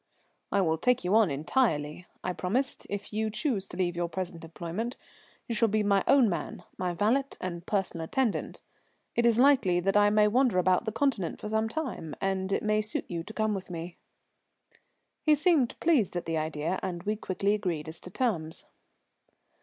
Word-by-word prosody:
"I 200 - +3
will 160 -3 +1
take 250 +4 +2
you 180 +2 0
on 220 -4 +5
entirely," 155 - 0 0.2
I 180 - -1
promised, 235 +10 -1
"if 205 +1 -5
you 220 +1 0
choose 215 -4 -1
to 175 - -9
leave 175 -2 0
your 170 0 -1
present 175 -2 -5
employment. 170 +9 -5 0.5
You 235 - -2
shall 230 +1 +3
be 215 0 +1
my 200 -1 +3
own 275 -4 +6
man, 175 - -3
my 180 -1 -2
valet 230 +9 +2
and 170 -2 -5
personal 190 -5 -1
attendant. 250 +5 -1 0.5
It 235 0 +3
is 230 -1 +3
likely 245 -9 +5
that 195 +3 0
I 205 0 +6
may 210 0 +4
wander 245 -1 +3
about 185 +4 +3
the 220 - -1
Continent 225 -7 0
for 210 - -5
some 220 +1 +1
time, 245 - -4
and 195 0 -1
it - - 0
may 215 0 +2
suit 215 +1 -3
you 170 -1 -3
to 210 - -9
come 215 -1 +1
with 190 -2 -5
me." 170 0 -6 1.2
He 305 -1 +5
seemed 300 -5 +2
pleased 280 - +2
at 175 - -2
the 165 - -2
idea, 155 +3 -1
and 175 -2 -4
we 210 +1 0
quickly 200 -1 0
agreed 175 -7 -2
as 160 +1 -8
to - - -10
terms. 180 -7 -2
200 Hz, 190 wpm, -29 LUFS, 175-225 Hz, 1.2 s, own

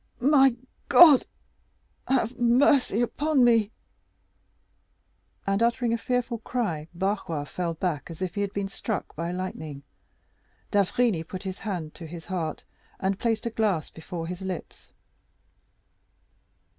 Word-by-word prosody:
"My 270 -1 +5 0.3
God, 310 -7 +8 0.8
have 255 -2 +1
mercy 245 -1 +4
upon 290 +2 +1
me!" 230 -4 +4 1.8
and, 195 +2 +1
uttering 235 0 +2
a - - +1
fearful 245 -1 -1
cry, 195 -11 -2
Barrois 180 -5 -2
fell 170 +3 -3
back 165 -3 -2
as 165 - -9
if 185 -2 -3
he 205 - -2
had 200 -1 -1
been 200 -1 -2
struck 205 +2 -4
by 170 +2 -3
lightning. 160 -6 -5 0.9
D'Avrigny 205 -1 +2
put 185 +3 -7
his 190 -1 -5
hand 175 -7 -4
to 165 - -9
his 165 0 -9
heart, 170 -5 -4 0.3
and 195 0 -1
placed 225 -2 0
a 235 - -1
glass 210 -8 0
before 165 +1 -6
his 180 +2 -6
lips. 190 -3 -7
195 Hz, 130 wpm, -26 LUFS, 170-235 Hz, 1.8 s, God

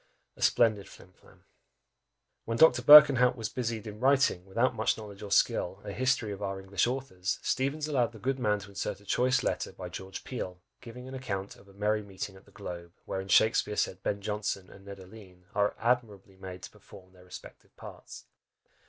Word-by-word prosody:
A - - -16
splendid 110 -4 +2
flim 90 - -16
flam! - - -23 1.0
When 115 0 -2
Dr. 125 -5 +6
Berkenhout 130 -3 +8
was 115 -3 -4
busied 115 -3 -4
in 105 -1 -8
writing, 130 -8 +2
without 115 +7 +1
much 110 +3 0
knowledge 105 -3 -10
or 105 - -7
skill, 95 -1 +1
a - - -5
history 125 0 0
of 100 0 -7
our 95 -1 -3
English 95 +3 0
authors, 110 -8 -3
Steevens 140 +3 -1
allowed 130 -6 +1
the 115 - -13
good 130 +4 -2
man 105 -4 +1
to 100 - -11
insert 100 0 -4
a 100 - -20
choice 130 +5 +1
letter - - -2
by - - -8
George 95 0 -8
Peele, 90 -8 -6 0.2
giving 125 0 -10
an 130 - -9
account 100 -7 -5
of 100 - -19
a 100 - -18
"merry 105 +2 0
meeting 100 -1 -7
at 95 - -17
the - - -21
Globe," 85 -4 -8
wherein 95 0 -4
Shakspeare 105 +1 +3
said 95 0 -1
Ben 100 0 -2
Jonson 105 -2 -3
and 100 0 -15
Ned 100 -1 -9
Alleyne 95 -2 -15
are 100 0 +1
admirably 110 -5 -1
made 95 -1 -10
to - - -9
perform 95 -3 -16
their 90 -1 -18
respective 90 - -13
parts. - - -11
105 Hz, 195 wpm, -29 LUFS, 95-125 Hz, 1.0 s, Berkenhout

